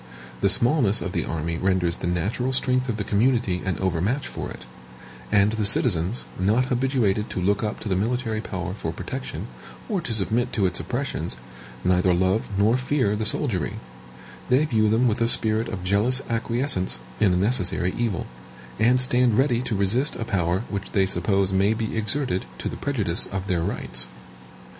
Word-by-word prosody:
The -, -, +4 dB
smallness 120 Hz, -5 st, +3 dB
of 95 Hz, -, -3 dB
the 85 Hz, -4 st, -1 dB
army 85 Hz, +1 st, -3 dB
renders 90 Hz, -3 st, +1 dB
the -, -, -4 dB
natural 105 Hz, +9 st, -1 dB
strength 130 Hz, 0 st, +2 dB
of 110 Hz, -, -1 dB
the 105 Hz, -, -2 dB
community 105 Hz, -3 st, +1 dB
an 95 Hz, -, -2 dB
overmatch 95 Hz, -, -1 dB
for -, -, -6 dB
it; -, -, -10 dB, 0.7 s
and 100 Hz, +1 st, +4 dB
the 110 Hz, -1 st, -1 dB
citizens, 100 Hz, -1 st, +2 dB, 0.2 s
not 105 Hz, +7 st, +2 dB
habituated 120 Hz, -5 st, +1 dB
to -, -, -4 dB
look 100 Hz, +3 st, +1 dB
up 105 Hz, -1 st, -3 dB
to -, -, -6 dB
the 95 Hz, -, +1 dB
military 110 Hz, +2 st, -1 dB
power 95 Hz, -3 st, -4 dB
for 85 Hz, -5 st, -4 dB
protection, 105 Hz, -, -6 dB, 0.4 s
or 200 Hz, -5 st, -1 dB
to 160 Hz, -, -5 dB
submit 115 Hz, +3 st, +1 dB
to 100 Hz, -, +1 dB
its 90 Hz, -1 st, -1 dB
oppressions, 120 Hz, -, -3 dB, 0.5 s
neither 90 Hz, 0 st, +3 dB
love 95 Hz, +4 st, +1 dB
nor 110 Hz, +5 st, +3 dB
fear 130 Hz, -5 st, 0 dB
the 110 Hz, +1 st, -2 dB
soldiery; 110 Hz, -, 0 dB, 0.7 s
they 130 Hz, +5 st, +4 dB
view 110 Hz, -6 st, +2 dB
them 115 Hz, +4 st, +3 dB
with 115 Hz, 0 st, 0 dB
a 115 Hz, -, +3 dB
spirit 110 Hz, -1 st, +3 dB
of 95 Hz, -2 st, -5 dB
jealous 105 Hz, +7 st, +2 dB
acquiescence 115 Hz, -, 0 dB, 0.2 s
in 100 Hz, -4 st, +4 dB
a -, -, +2 dB
necessary 90 Hz, -3 st, +2 dB
evil, 115 Hz, -7 st, -1 dB, 0.5 s
and 120 Hz, +3 st, +4 dB
stand 125 Hz, -3 st, +2 dB
ready 125 Hz, -3 st, +2 dB
to 120 Hz, -3 st, -2 dB
resist 105 Hz, +9 st, +1 dB
a 115 Hz, -, -4 dB
power 90 Hz, -1 st, 0 dB
which 100 Hz, -1 st, -5 dB
they 95 Hz, -1 st, +3 dB
suppose 95 Hz, +1 st, +1 dB
may 100 Hz, +3 st, +3 dB
be 110 Hz, -1 st, -3 dB
exerted 110 Hz, -2 st, 0 dB
to -, -, -4 dB
the -, -, -4 dB
prejudice 105 Hz, -12 st, -1 dB
of 95 Hz, 0 st, -4 dB
their 90 Hz, -4 st, 0 dB
rights. -, -, -2 dB
105 Hz, 180 wpm, -24 LUFS, 95-120 Hz, 0.7 s, The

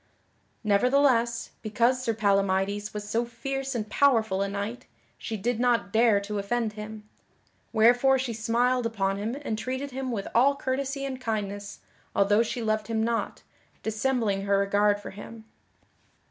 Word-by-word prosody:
Nevertheless, 235 Hz, +2 st, +2 dB
because 235 Hz, +4 st, +1 dB
Sir 230 Hz, -3 st, -1 dB
Palamydes 200 Hz, 0 st, +1 dB
was 210 Hz, 0 st, -6 dB
so 225 Hz, +3 st, 0 dB
fierce 270 Hz, +3 st, -4 dB
and 215 Hz, -2 st, -2 dB
powerful 220 Hz, -5 st, +2 dB
a 200 Hz, -, +1 dB
knight, 205 Hz, +5 st, -5 dB, 0.3 s
she 220 Hz, -, -4 dB
did 235 Hz, +3 st, -1 dB
not 240 Hz, -5 st, +1 dB
dare 220 Hz, -2 st, +5 dB
to 205 Hz, +1 st, -4 dB
offend 220 Hz, +2 st, -1 dB
him; 210 Hz, 0 st, -8 dB, 0.6 s
wherefore 245 Hz, +4 st, +5 dB
she 255 Hz, -2 st, -2 dB
smiled 235 Hz, +2 st, +1 dB
upon 195 Hz, -3 st, -1 dB
him 220 Hz, +6 st, -3 dB
and 220 Hz, -5 st, -2 dB
treated 260 Hz, +4 st, -4 dB
him 260 Hz, 0 st, -4 dB
with 205 Hz, -4 st, -3 dB
all 270 Hz, +5 st, +4 dB
courtesy 275 Hz, +1 st, -2 dB
and 260 Hz, -1 st, -5 dB
kindness 205 Hz, -3 st, -4 dB, 0.3 s
although 205 Hz, +2 st, +4 dB
she 235 Hz, +1 st, -2 dB
loved 215 Hz, -1 st, 0 dB
him 225 Hz, -1 st, 0 dB
not, 230 Hz, 0 st, -2 dB, 0.4 s
dissembling 220 Hz, -2 st, 0 dB
her 200 Hz, 0 st, +3 dB
regard 205 Hz, +1 st, +2 dB
for 205 Hz, -, -8 dB
him. 220 Hz, +3 st, -10 dB
225 Hz, 150 wpm, -27 LUFS, 205-245 Hz, 0.6 s, dare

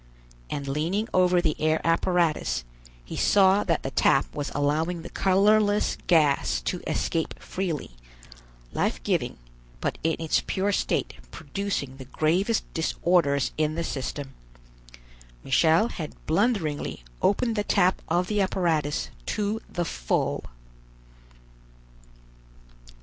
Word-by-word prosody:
And 140 Hz, -1 st, -4 dB
leaning 165 Hz, +10 st, -1 dB
over 180 Hz, -1 st, +4 dB
the 155 Hz, -3 st, +1 dB
air 155 Hz, +1 st, +2 dB
apparatus, 165 Hz, -, +1 dB, 0.4 s
he -, -, -7 dB
saw 195 Hz, 0 st, +4 dB
that 165 Hz, -3 st, 0 dB
the 135 Hz, -, -3 dB
tap 135 Hz, -, +2 dB
was 145 Hz, -1 st, -3 dB
allowing 160 Hz, +4 st, 0 dB
the -, -, -9 dB
colorless 205 Hz, +2 st, +3 dB
gas 145 Hz, -, +3 dB
to -, -, -3 dB
escape 165 Hz, -1 st, -1 dB
freely, 175 Hz, -, -4 dB, 0.8 s
life -, -, -1 dB
giving, -, -, -1 dB, 0.4 s
but -, -, -2 dB
in 160 Hz, 0 st, +1 dB
its 160 Hz, -1 st, +1 dB
pure 195 Hz, +2 st, 0 dB
state -, -, 0 dB, 0.2 s
producing 195 Hz, -10 st, -4 dB
the 130 Hz, -, -9 dB
gravest 175 Hz, -, +1 dB
disorders 160 Hz, -4 st, +1 dB
in 155 Hz, 0 st, +1 dB
the 170 Hz, -, -1 dB
system. 135 Hz, -1 st, -4 dB, 1.1 s
Michel 160 Hz, -, +3 dB
had 160 Hz, -9 st, -6 dB
blunderingly 165 Hz, -, 0 dB, 0.2 s
opened 230 Hz, +3 st, +2 dB
the 210 Hz, -, 0 dB
tap 185 Hz, -2 st, +2 dB
of 175 Hz, +2 st, +1 dB
the 210 Hz, +1 st, 0 dB
apparatus 165 Hz, -6 st, 0 dB, 0.2 s
to 210 Hz, +2 st, -1 dB
the 175 Hz, -1 st, -2 dB
full. -, -, -1 dB
165 Hz, 115 wpm, -26 LUFS, 150-195 Hz, 1.1 s, over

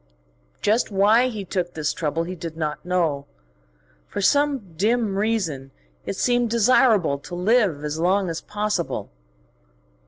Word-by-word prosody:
Just 220 Hz, +3 st, +2 dB
why 215 Hz, +5 st, +4 dB
he 215 Hz, -6 st, -5 dB
took 180 Hz, -1 st, -3 dB
this 155 Hz, -2 st, -1 dB
trouble 160 Hz, +1 st, -2 dB
he 180 Hz, +2 st, -5 dB
did 165 Hz, -2 st, -7 dB
not 155 Hz, -2 st, -3 dB
know: 170 Hz, -6 st, -1 dB, 0.8 s
for -, -, -5 dB
some 275 Hz, -, +1 dB
dim 215 Hz, +2 st, +1 dB
reason 190 Hz, -11 st, -1 dB, 0.4 s
it -, -, -2 dB
seemed 245 Hz, +2 st, +1 dB
desirable 225 Hz, -, +3 dB
to 175 Hz, +5 st, -8 dB
live 185 Hz, -5 st, +2 dB
as 150 Hz, +1 st, -3 dB
long 190 Hz, +3 st, +2 dB
as 165 Hz, -1 st, -4 dB
possible. 210 Hz, -4 st, -3 dB
190 Hz, 135 wpm, -23 LUFS, 165-225 Hz, 0.8 s, why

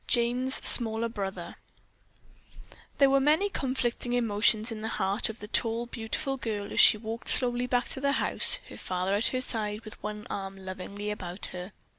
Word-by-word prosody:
JANE'S 245 Hz, +2 st, +1 dB
SMALL 230 Hz, -1 st, +7 dB
BROTHER 200 Hz, -3 st, -7 dB, 1.4 s
There 275 Hz, -1 st, +4 dB
were 275 Hz, -, +3 dB
many 310 Hz, +9 st, +1 dB
conflicting 250 Hz, -5 st, -2 dB
emotions 220 Hz, -1 st, +1 dB
in 220 Hz, -1 st, -7 dB
the 220 Hz, -, -4 dB
heart 195 Hz, +5 st, -1 dB
of 220 Hz, -, -8 dB
the 210 Hz, -, -8 dB
tall, 230 Hz, +2 st, -1 dB
beautiful 245 Hz, +4 st, -5 dB
girl 210 Hz, -4 st, -5 dB
as -, -, -2 dB
she -, -, +7 dB
walked 225 Hz, +2 st, -7 dB
slowly 245 Hz, -1 st, +2 dB
back 245 Hz, -1 st, -1 dB
to 265 Hz, -, -6 dB
the 280 Hz, 0 st, 0 dB
house, -, -, +3 dB
her -, -, -11 dB
father 185 Hz, +1 st, -3 dB
at 210 Hz, +3 st, +1 dB
her 255 Hz, -, -2 dB
side 215 Hz, -3 st, -2 dB
with 215 Hz, -, -11 dB
one 210 Hz, 0 st, -7 dB
arm 195 Hz, -1 st, -7 dB
lovingly 195 Hz, +2 st, -7 dB
about 185 Hz, -2 st, -4 dB
her. 180 Hz, +2 st, -8 dB
225 Hz, 175 wpm, -27 LUFS, 205-245 Hz, 1.4 s, SMALL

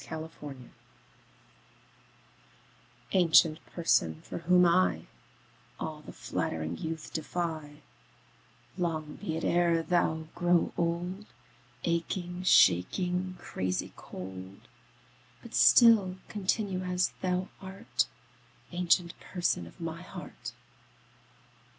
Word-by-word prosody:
7 160 Hz, -, -6 dB
Autoplay 140 Hz, -5 st, -10 dB, 2.4 s
Ancient 165 Hz, -3 st, +5 dB
Person, 80 Hz, -, +1 dB
for -, -, -6 dB
whom 180 Hz, +2 st, +5 dB
I 90 Hz, -, +3 dB, 0.7 s
All 155 Hz, -1 st, -5 dB
the -, -, -10 dB
flattering 80 Hz, +1 st, -3 dB
youth 160 Hz, -, -6 dB
defy, 155 Hz, -2 st, -4 dB, 1.0 s
Long 155 Hz, -3 st, -2 dB
be 160 Hz, -6 st, -3 dB
it 165 Hz, -, -4 dB
e'er 170 Hz, -1 st, +3 dB
thou 160 Hz, -2 st, +1 dB
grow 175 Hz, 0 st, +2 dB
old, 175 Hz, +4 st, -2 dB, 0.6 s
Aching, 175 Hz, +1 st, -2 dB
shaking, 180 Hz, -, +3 dB
crazy 95 Hz, 0 st, -3 dB
cold; 95 Hz, +1 st, -9 dB, 0.8 s
But -, -, -11 dB
still 220 Hz, -6 st, +6 dB
continue 200 Hz, -1 st, -1 dB
as 180 Hz, 0 st, +1 dB
thou 185 Hz, 0 st, -1 dB
art, 195 Hz, +4 st, -2 dB, 0.6 s
Ancient 175 Hz, -1 st, +2 dB
Person 175 Hz, -, -1 dB
of -, -, -16 dB
my 165 Hz, 0 st, -5 dB
heart. 180 Hz, -, -8 dB
170 Hz, 95 wpm, -30 LUFS, 150-180 Hz, 2.4 s, still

